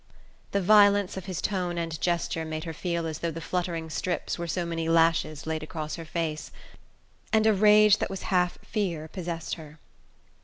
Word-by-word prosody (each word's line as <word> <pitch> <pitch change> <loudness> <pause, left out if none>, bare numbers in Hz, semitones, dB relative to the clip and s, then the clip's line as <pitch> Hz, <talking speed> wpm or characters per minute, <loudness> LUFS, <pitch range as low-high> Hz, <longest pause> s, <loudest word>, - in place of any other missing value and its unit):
The 200 -1 0
violence 205 0 +5
of 190 -2 -6
his 185 -3 -4
tone 180 -3 -1
and 165 -1 -3
gesture 170 -2 0
made 155 0 -4
her 165 - -5
feel 170 0 -2
as 160 -1 -4
though 170 - -1
the 165 0 -6
fluttering 170 -1 -3
strips 175 +1 -2
were 170 - -3
so 175 +1 -1
many 165 -1 -2
lashes 165 -2 +2
laid 160 0 -2
across 155 -1 -5
her 165 - -8
face, 155 -1 -3 0.8
and 220 -1 +3
a 220 - +5
rage 210 +1 +6
that - - -1
was 195 -1 -6
half 180 -1 +2
fear 175 -8 -2
possessed 170 -1 -5
her. 155 0 -13
170 Hz, 185 wpm, -27 LUFS, 160-190 Hz, 0.8 s, rage